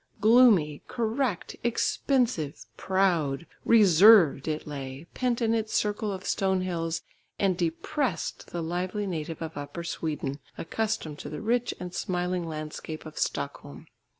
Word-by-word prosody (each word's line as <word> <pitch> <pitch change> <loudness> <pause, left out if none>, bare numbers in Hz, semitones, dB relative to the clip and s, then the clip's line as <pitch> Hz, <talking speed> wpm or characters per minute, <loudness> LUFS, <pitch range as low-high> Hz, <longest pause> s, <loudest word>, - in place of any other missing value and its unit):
Gloomy, 215 - +5
correct, 230 -3 -1
expensive, 235 - 0
proud, 170 -6 +1 0.2
reserved 195 - +6
it 155 0 -2
lay, 140 0 -6
pent 245 -2 0
in 225 0 +2
its 220 -1 -1
circle 210 0 0
of 185 -1 -6
stone 190 -1 +1
hills, 165 -2 -2 0.3
and 195 -2 +2
depressed 190 - -2
the 170 -1 -4
lively 180 +5 -2
native 165 -3 -4
of 160 0 -6
Upper 145 +4 -6
Sweden, 150 -4 -3 0.2
accustomed 205 -6 -2
to - - -6
the 150 - -5
rich 240 +2 0
and 180 0 -6
smiling 180 -1 -2
landscape 155 0 -6
of 155 -1 -8
Stockholm. - - -4
180 Hz, 130 wpm, -28 LUFS, 155-220 Hz, 0.3 s, reserved